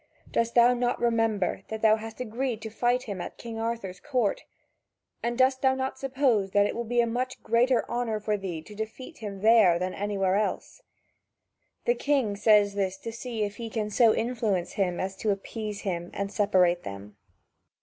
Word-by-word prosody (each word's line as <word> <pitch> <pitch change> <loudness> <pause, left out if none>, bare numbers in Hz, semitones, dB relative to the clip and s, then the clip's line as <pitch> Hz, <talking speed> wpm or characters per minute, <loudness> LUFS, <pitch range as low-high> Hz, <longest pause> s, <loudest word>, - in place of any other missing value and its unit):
Dost 230 0 0
thou 240 +1 +6
not 245 0 0
remember 225 -5 +1
that 220 0 -6
thou 215 -1 +6
hast 225 +1 -8
agreed 250 0 -2
to 220 - -6
fight 245 +3 +1
him 200 -4 -5
at - - -7
King 230 -1 -7
Arthur's 225 -5 -3
court? 250 -6 -1 0.8
And 235 0 -2
dost 260 0 +3
thou 265 -1 +3
not 265 0 -3
suppose 260 -7 +1
that 205 0 +5
it - - -2
would 235 -1 -4
be 240 0 +3
a - - +2
much 250 +2 -3
greater 240 +2 +2
honour 235 -3 -1
for 210 0 -1
thee 180 -6 -5
to 210 - -12
defeat 220 +4 -7
him 200 -3 -6
there 215 -6 +6
than 185 +1 -2
anywhere 195 -1 0
else?" 215 - -3 1.0
The 485 - +4
king 275 - 0
says 205 -1 +4
this 190 -2 -1
to 230 - -6
see 230 -1 -4
if 205 0 -4
he 230 -1 -5
can 215 -1 -3
so 230 +1 +5
influence 220 -7 -1
him 180 -3 -1
as 190 +1 -3
to 215 - -2
appease 205 +1 -3
him 175 -3 -3
and 200 0 -3
separate 185 -5 +3
them. 100 +1 -8
220 Hz, 190 wpm, -27 LUFS, 200-240 Hz, 1.0 s, thou